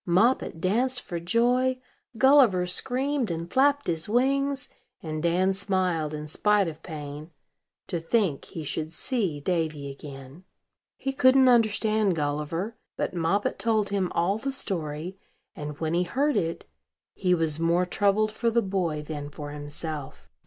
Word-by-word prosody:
Moppet 190 Hz, 0 st, +2 dB
danced 245 Hz, +8 st, +1 dB
for 170 Hz, -, -4 dB
joy; 245 Hz, +8 st, +2 dB, 0.4 s
Gulliver 255 Hz, -9 st, +5 dB
screamed 255 Hz, +6 st, -1 dB
and 170 Hz, 0 st, -5 dB
flapped 285 Hz, +2 st, +3 dB
his 165 Hz, +1 st, -2 dB
wings; 275 Hz, +3 st, +1 dB, 0.4 s
and 155 Hz, -1 st, -4 dB
Dan 180 Hz, +3 st, +2 dB
smiled, 185 Hz, -6 st, 0 dB
in 150 Hz, 0 st, -6 dB
spite 205 Hz, +5 st, +2 dB
of 160 Hz, -1 st, -7 dB
pain, 150 Hz, -1 st, -7 dB, 0.6 s
to 170 Hz, -, -3 dB
think 165 Hz, -3 st, 0 dB
he 160 Hz, -, -7 dB
should 155 Hz, +2 st, -3 dB
see 190 Hz, -, -1 dB
Davy 155 Hz, -3 st, -2 dB
again. 135 Hz, +3 st, -11 dB, 0.5 s
He 270 Hz, -, -3 dB
couldn't 260 Hz, 0 st, +5 dB
understand 215 Hz, -4 st, +3 dB
Gulliver; 150 Hz, +8 st, -2 dB, 0.2 s
but -, -, -2 dB
Moppet 180 Hz, +4 st, 0 dB
told 220 Hz, -2 st, +1 dB
him 195 Hz, -3 st, -1 dB
all 190 Hz, +5 st, +1 dB
the 275 Hz, +3 st, -2 dB
story, 175 Hz, -, -3 dB, 0.4 s
and, 150 Hz, -3 st, -6 dB
when 160 Hz, 0 st, -1 dB
he 175 Hz, -, +2 dB
heard 280 Hz, +10 st, +1 dB
it, 170 Hz, -5 st, -1 dB, 0.5 s
he 180 Hz, -2 st, +2 dB
was 160 Hz, -2 st, 0 dB
more 170 Hz, +2 st, +2 dB
troubled 205 Hz, +3 st, +2 dB
for 230 Hz, +2 st, 0 dB
the 230 Hz, 0 st, +2 dB
boy 180 Hz, -6 st, -1 dB
than 150 Hz, -1 st, -6 dB
for 145 Hz, 0 st, -8 dB
himself. 145 Hz, 0 st, -4 dB
180 Hz, 145 wpm, -26 LUFS, 155-230 Hz, 0.6 s, Gulliver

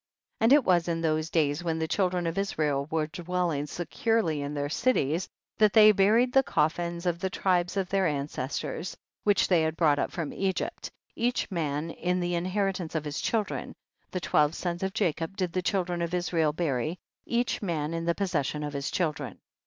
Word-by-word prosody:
38. -, -, -2 dB
And 255 Hz, -, +6 dB
it 290 Hz, -, +1 dB
was 175 Hz, -2 st, +3 dB
in 165 Hz, -1 st, -1 dB
those 155 Hz, -1 st, 0 dB
days, 150 Hz, -1 st, +1 dB
when 165 Hz, -2 st, -1 dB
the 160 Hz, 0 st, -1 dB
children 180 Hz, -1 st, 0 dB
of 165 Hz, 0 st, -1 dB
Israel 150 Hz, -8 st, 0 dB
were 160 Hz, -1 st, 0 dB
dwelling 170 Hz, -2 st, -2 dB
securely 175 Hz, 0 st, 0 dB
in 145 Hz, +1 st, -4 dB
their 145 Hz, 0 st, -1 dB
cities, 165 Hz, -, +1 dB, 0.3 s
that 215 Hz, -2 st, +5 dB
they 215 Hz, -1 st, +9 dB
bu 195 Hz, 0 st, +4 dB
ried 245 Hz, +3 st, +3 dB
the 270 Hz, -, +7 dB
coffins 170 Hz, -, -1 dB
of 170 Hz, -1 st, 0 dB
the 190 Hz, -, -1 dB
tribes 180 Hz, 0 st, 0 dB
of 190 Hz, -2 st, 0 dB
their 195 Hz, -1 st, +2 dB
ancestors, 145 Hz, +3 st, -3 dB, 0.3 s
which 205 Hz, -1 st, +4 dB
they 175 Hz, -3 st, +4 dB
had 160 Hz, 0 st, -1 dB
brought 150 Hz, -4 st, +3 dB
up -, -, 0 dB
from 165 Hz, -4 st, -4 dB
Egypt, 190 Hz, -1 st, -2 dB, 0.3 s
each 245 Hz, -1 st, 0 dB
man 155 Hz, -2 st, -2 dB
in 180 Hz, +2 st, -1 dB
the 175 Hz, 0 st, -1 dB
in 170 Hz, 0 st, -1 dB
heritance 185 Hz, -3 st, -1 dB
of 155 Hz, -1 st, -1 dB
his 145 Hz, -1 st, -3 dB
children, 220 Hz, -3 st, -2 dB, 0.3 s
the 185 Hz, -, -3 dB
twelve 155 Hz, -1 st, +2 dB
sons 175 Hz, -1 st, -3 dB
of 190 Hz, 0 st, -1 dB
Jacob 175 Hz, -1 st, -1 dB
did 180 Hz, -3 st, -1 dB
the 185 Hz, -, 0 dB
children 180 Hz, -3 st, -1 dB
of 170 Hz, +1 st, -1 dB
Is 180 Hz, 0 st, -2 dB
rael 160 Hz, -3 st, +3 dB
bury, 155 Hz, 0 st, -1 dB, 0.3 s
each 240 Hz, +1 st, 0 dB
man 165 Hz, -5 st, -2 dB
in 165 Hz, 0 st, -3 dB
the 170 Hz, 0 st, +1 dB
possession 150 Hz, -6 st, -1 dB
of 145 Hz, -1 st, -4 dB
his 140 Hz, -1 st, -2 dB
children. 155 Hz, -4 st, -2 dB
170 Hz, 200 wpm, -28 LUFS, 155-190 Hz, 0.3 s, they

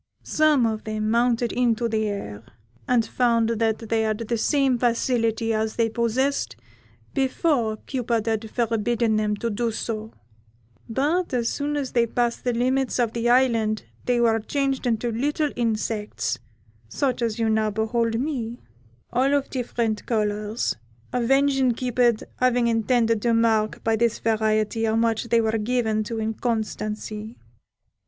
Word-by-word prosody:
Some 305 Hz, -5 st, +3 dB
of 220 Hz, -1 st, -2 dB
them 215 Hz, 0 st, -2 dB
mounted 235 Hz, 0 st, +2 dB
into 235 Hz, -1 st, +1 dB
the 220 Hz, -1 st, 0 dB
air, 115 Hz, -, -5 dB, 0.4 s
and 240 Hz, -3 st, +3 dB
found 230 Hz, -2 st, +2 dB
that 225 Hz, -1 st, +1 dB
they 225 Hz, -1 st, +2 dB
had 215 Hz, -1 st, 0 dB
the 230 Hz, +1 st, -2 dB
same 270 Hz, -2 st, +2 dB
facility 230 Hz, -2 st, +1 dB
as 220 Hz, 0 st, -1 dB
they 230 Hz, -1 st, +2 dB
possessed 235 Hz, +5 st, 0 dB, 0.6 s
before 265 Hz, -4 st, +1 dB
Cupid 235 Hz, -4 st, -1 dB
had 220 Hz, -1 st, -1 dB
forbidden 230 Hz, -1 st, 0 dB
them 210 Hz, -1 st, 0 dB
to 230 Hz, +2 st, -3 dB
do 230 Hz, +2 st, -1 dB
so; 220 Hz, 0 st, -4 dB, 0.8 s
but 290 Hz, +6 st, 0 dB
as 235 Hz, -2 st, +1 dB
soon 290 Hz, +1 st, -2 dB
as 275 Hz, -3 st, -3 dB
they 235 Hz, -1 st, +2 dB
passed 240 Hz, 0 st, -1 dB
the 245 Hz, -, +1 dB
limits 255 Hz, +2 st, +1 dB
of 235 Hz, -3 st, +1 dB
the 235 Hz, 0 st, 0 dB
Island 230 Hz, -4 st, +2 dB, 0.2 s
they 245 Hz, -1 st, +2 dB
were 225 Hz, -1 st, +3 dB
changed 270 Hz, +3 st, -1 dB
into 235 Hz, 0 st, 0 dB
little 290 Hz, +5 st, 0 dB
insects, 215 Hz, -, -2 dB, 0.5 s
such 255 Hz, -, -1 dB
as 230 Hz, -2 st, -1 dB
you 225 Hz, -1 st, +1 dB
now 220 Hz, -1 st, +2 dB
behold 225 Hz, +2 st, 0 dB
me, 245 Hz, -4 st, -3 dB, 0.5 s
all 265 Hz, +4 st, +3 dB
of 280 Hz, -1 st, -1 dB
different 235 Hz, -4 st, -2 dB
colours, 210 Hz, 0 st, -1 dB, 0.4 s
avenging 270 Hz, +1 st, +3 dB
Cupid 240 Hz, -1 st, +1 dB
having 245 Hz, -1 st, +2 dB
intended 230 Hz, -1 st, +2 dB
to 235 Hz, 0 st, +2 dB
mark 220 Hz, -2 st, +1 dB
by 225 Hz, 0 st, +2 dB
this 230 Hz, 0 st, +1 dB
variety 220 Hz, 0 st, +1 dB
how 220 Hz, 0 st, +1 dB
much 225 Hz, 0 st, +1 dB
they 235 Hz, 0 st, +3 dB
were 220 Hz, 0 st, 0 dB
given 220 Hz, -1 st, 0 dB
to 230 Hz, +1 st, -4 dB
inconstancy. 220 Hz, -1 st, -3 dB
230 Hz, 145 wpm, -24 LUFS, 220-245 Hz, 0.8 s, Some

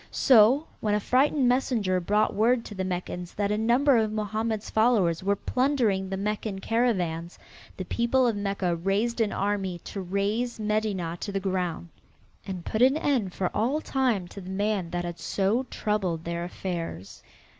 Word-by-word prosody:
So, 255 Hz, +4 st, +5 dB
when 210 Hz, -1 st, +1 dB
a -, -, +2 dB
frightened 265 Hz, +4 st, +2 dB
messenger 235 Hz, -7 st, +1 dB
brought 210 Hz, +4 st, +1 dB
word 230 Hz, +2 st, +2 dB
to -, -, -8 dB
the 190 Hz, -1 st, -3 dB
Meccans 180 Hz, -1 st, -4 dB
that 205 Hz, 0 st, 0 dB
a -, -, +2 dB
number 245 Hz, +4 st, +4 dB
of 220 Hz, -1 st, +1 dB
Mohammed's 215 Hz, +1 st, -2 dB
followers 215 Hz, -8 st, +3 dB
were 200 Hz, +2 st, +1 dB
plundering 235 Hz, -6 st, 0 dB
the 195 Hz, -, -3 dB
Meccan 210 Hz, 0 st, -2 dB
caravans, 185 Hz, -7 st, -1 dB, 0.4 s
the 185 Hz, -, -4 dB
people 235 Hz, +6 st, +1 dB
of 235 Hz, -3 st, +1 dB
Mecca 195 Hz, -3 st, -1 dB
raised 200 Hz, +7 st, 0 dB
an 215 Hz, -2 st, +1 dB
army 195 Hz, -3 st, -1 dB
to 195 Hz, -, -6 dB
raze 200 Hz, +6 st, -1 dB
Medinah 210 Hz, -5 st, -1 dB
to 205 Hz, -, -4 dB
the 195 Hz, -, -1 dB
ground 180 Hz, -3 st, -2 dB, 0.6 s
and 185 Hz, -3 st, -5 dB
put 220 Hz, -, -2 dB
an 265 Hz, +4 st, +5 dB
end 250 Hz, -, 0 dB
for 180 Hz, -, -1 dB
all 250 Hz, +8 st, +1 dB
time 250 Hz, -, 0 dB
to 200 Hz, -, -9 dB
the 185 Hz, -, -9 dB
man 200 Hz, -2 st, -1 dB
that 175 Hz, 0 st, -3 dB
had 175 Hz, -1 st, -6 dB
so 215 Hz, +7 st, 0 dB
troubled 190 Hz, -6 st, -1 dB
their 170 Hz, 0 st, -3 dB
affairs. 170 Hz, -, -6 dB
205 Hz, 170 wpm, -27 LUFS, 185-230 Hz, 0.6 s, So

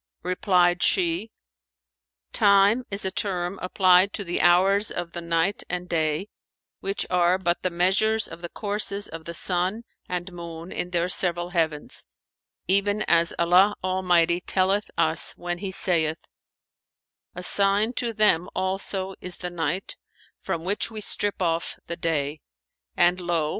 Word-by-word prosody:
Replied 180 Hz, -1 st, +1 dB
she, 180 Hz, +3 st, +1 dB, 1.0 s
"Time 200 Hz, +4 st, +4 dB
is 200 Hz, 0 st, -5 dB
a 190 Hz, -, -1 dB
term 185 Hz, -2 st, -2 dB
applied 185 Hz, +1 st, +3 dB
to 205 Hz, -, -3 dB
the 175 Hz, -2 st, -2 dB
hours 195 Hz, +4 st, +4 dB
of 175 Hz, -1 st, -3 dB
the 170 Hz, -, -6 dB
night 170 Hz, +3 st, 0 dB
and 180 Hz, 0 st, -4 dB
day, 160 Hz, +2 st, -1 dB, 0.5 s
which 195 Hz, +1 st, -2 dB
are 180 Hz, 0 st, +3 dB
but 175 Hz, -2 st, -1 dB
the 185 Hz, -, -1 dB
measures 190 Hz, +5 st, +2 dB
of 170 Hz, -, -11 dB
the 170 Hz, -, -6 dB
courses 205 Hz, 0 st, 0 dB
of 160 Hz, 0 st, -10 dB
the 170 Hz, -, -6 dB
sun 185 Hz, +6 st, 0 dB, 0.3 s
and 180 Hz, +1 st, -4 dB
moon 170 Hz, 0 st, -9 dB
in 175 Hz, -, -4 dB
their 175 Hz, -1 st, 0 dB
several 175 Hz, -1 st, +3 dB
heavens, 160 Hz, -4 st, -2 dB, 0.6 s
even 205 Hz, +3 st, +1 dB
as 170 Hz, 0 st, +2 dB
Allah 180 Hz, +4 st, +4 dB
Almighty 180 Hz, -2 st, +2 dB
telleth 195 Hz, +3 st, 0 dB
us 160 Hz, +1 st, +2 dB
when 175 Hz, 0 st, -5 dB
he 195 Hz, -, -5 dB
saith, 165 Hz, -4 st, +2 dB, 1.2 s
'A 180 Hz, -, -7 dB
sign 200 Hz, +5 st, +2 dB
to 240 Hz, -2 st, -1 dB
them 205 Hz, -5 st, +2 dB
also 190 Hz, 0 st, -2 dB
is 180 Hz, -1 st, -3 dB
the 180 Hz, -1 st, -6 dB
Night, 170 Hz, +2 st, -3 dB, 0.4 s
from 165 Hz, -, -4 dB
which 200 Hz, +5 st, -1 dB
we 220 Hz, -1 st, -8 dB
strip 205 Hz, -2 st, +1 dB
off 165 Hz, -1 st, -1 dB
the 170 Hz, -, -5 dB
day, 150 Hz, -3 st, -2 dB, 0.6 s
and 175 Hz, +1 st, +3 dB
lo! 170 Hz, -4 st, -1 dB
180 Hz, 145 wpm, -24 LUFS, 170-195 Hz, 1.2 s, Time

